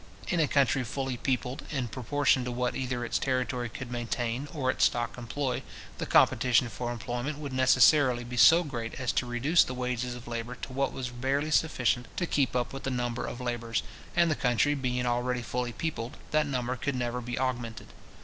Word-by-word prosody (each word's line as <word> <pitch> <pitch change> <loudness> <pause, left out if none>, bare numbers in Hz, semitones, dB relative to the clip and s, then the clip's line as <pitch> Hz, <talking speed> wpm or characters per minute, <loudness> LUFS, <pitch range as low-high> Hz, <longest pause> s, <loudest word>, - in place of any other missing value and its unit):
In 175 - +1
a 155 - +4
country 135 -2 +2
fully 130 +2 -3
peopled 125 +1 -2
in 130 -5 -2
proportion 130 +3 +1
to 125 - -3
what 125 0 -1
either 125 -2 -2
its - - 0
territory 125 -2 -1
could 125 +1 -7
maintain, 120 +2 -2
or 135 -6 0
its - - +3
stock 120 -1 0
employ, 125 +2 -2 0.4
the - - -3
competition 125 -1 +4
for 120 +3 -4
employment 120 +5 -3
would 145 -3 -6
necessarily 130 0 +5
be 120 +1 -7
so 165 +8 +7
great 120 -7 -5
as 130 -2 -1
to 125 - -1
reduce 135 +8 +4
the 130 - -5
wages 125 -1 -2
of 120 -1 -10
labour 120 +1 -4
to 130 - -8
what 135 +1 0
was 125 -2 -4
barely 135 +5 -1
sufficient 125 -6 +2
to 175 - +1
keep 140 -6 +1
up 120 -1 0
the - - -2
number 120 -2 -2
of 120 - -6
labourers, 120 -2 -2 0.3
and 170 -1 +4
the - - +2
country 125 +3 +2
being 125 -3 -1
already 125 0 0
fully 125 0 -2
peopled, 130 -1 -4
that 155 -1 +2
number 130 -2 -1
could 140 +2 -2
never 125 0 -2
be 120 0 -4
augmented. 125 -3 -3
125 Hz, 195 wpm, -29 LUFS, 120-135 Hz, 0.4 s, so